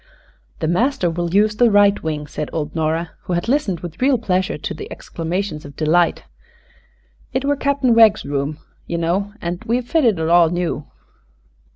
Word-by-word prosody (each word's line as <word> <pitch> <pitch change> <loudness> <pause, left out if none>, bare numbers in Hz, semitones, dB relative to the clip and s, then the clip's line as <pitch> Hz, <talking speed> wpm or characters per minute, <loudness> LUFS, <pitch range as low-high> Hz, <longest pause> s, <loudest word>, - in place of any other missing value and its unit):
"The - - 0
master 185 - +1
will 170 0 -3
use 210 +2 +3
the 240 0 +5
right 205 -1 +4
wing," 150 -2 -3
said 150 0 -5
old 155 -2 -3
Nora, 160 +1 -1
who 180 - -2
had 175 +4 -1
listened 235 - 0
with 175 +2 -8
real 265 0 +4
pleasure 190 -3 -1
to - - -5
the 420 +2 -9
exclamations 165 -1 -4
of 145 -1 -11
delight. 165 +2 +2 1.1
"It 260 +1 -1
were 285 +1 +2
Cap'n 280 -3 +1
Wegg's 220 -2 +5
room, 140 +1 -2 0.3
ye 170 - -2
know, 180 +5 -1
an' 175 +1 -3
we've 240 +2 0
fitted 245 - +2
it 160 0 -1
all 170 -1 +5
new." 175 -4 -2
175 Hz, 175 wpm, -20 LUFS, 160-230 Hz, 1.1 s, the